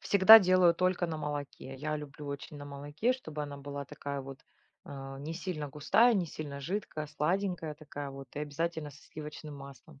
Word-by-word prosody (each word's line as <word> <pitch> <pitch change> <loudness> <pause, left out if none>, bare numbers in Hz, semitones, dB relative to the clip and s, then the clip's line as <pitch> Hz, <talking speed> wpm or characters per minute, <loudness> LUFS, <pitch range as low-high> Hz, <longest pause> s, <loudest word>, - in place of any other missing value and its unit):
Всегда 205 +3 +10
делаю 185 -3 +5
только 185 0 +1
на 160 -1 -3
молоке. 145 -3 -5
Я 150 +3 -2
люблю 150 0 -8
очень 140 +1 -6
на 145 - -8
молоке, 145 - -1
чтобы 155 - -6
она 145 -1 -6
была 140 0 -6
такая 140 +1 -5
вот, 135 0 -9 0.5
а, 135 -1 -8
не 155 +4 -5
сильно 165 -4 -4
густая, 160 - +4
не 185 -5 +1
сильно 145 -2 -6
жидкая, 160 -1 -3
сладенькая 165 +1 -1
такая 145 -2 -7
вот 135 -1 -9
и - - -4
обязательно 150 +1 -2
со 145 0 -16
сливочным 150 -1 -8
маслом. 140 +1 -12
150 Hz, 180 wpm, -31 LUFS, 140-170 Hz, 0.5 s, Всегда